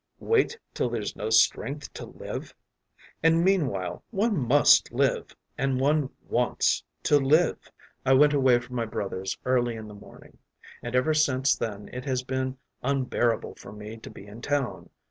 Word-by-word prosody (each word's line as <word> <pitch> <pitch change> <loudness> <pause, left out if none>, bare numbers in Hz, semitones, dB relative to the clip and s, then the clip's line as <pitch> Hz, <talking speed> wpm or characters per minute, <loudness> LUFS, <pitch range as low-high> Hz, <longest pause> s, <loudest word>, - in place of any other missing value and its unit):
Wait 455 +1 +1 0.2
till 125 - -1
there’s 115 -3 -3
no 105 - -4
strength 135 +6 +2
to - - -8
live? - - -7 0.7
And 165 +1 +4
meanwhile 140 - 0
one 215 0 +1
must 140 -1 +5
live, - - 0 0.2
and 135 -1 0
one 145 0 +2 0.2
wants - - +1 0.2
to 145 - +4
live! 150 +6 +2 0.3
“I 135 - +4
went 145 +2 +6
away 130 -3 +4
from 125 +1 -7
my 115 - 0
brother’s 95 -3 -4
early 120 -2 +1
in 110 -1 -8
the 105 - -10
morning, 105 - -15 0.4
and 120 +1 -5
ever 130 +5 +3
since 140 -3 +2
then 105 -2 -5
it 125 +1 -6
has 130 -2 -1
been 130 0 -3 0.2
unbearable 125 -3 0
for - - -11
me 105 +1 -8
to 110 - -11
be 100 - -12
in 105 +3 -11
town. 145 -2 -2
130 Hz, 165 wpm, -27 LUFS, 115-145 Hz, 0.7 s, went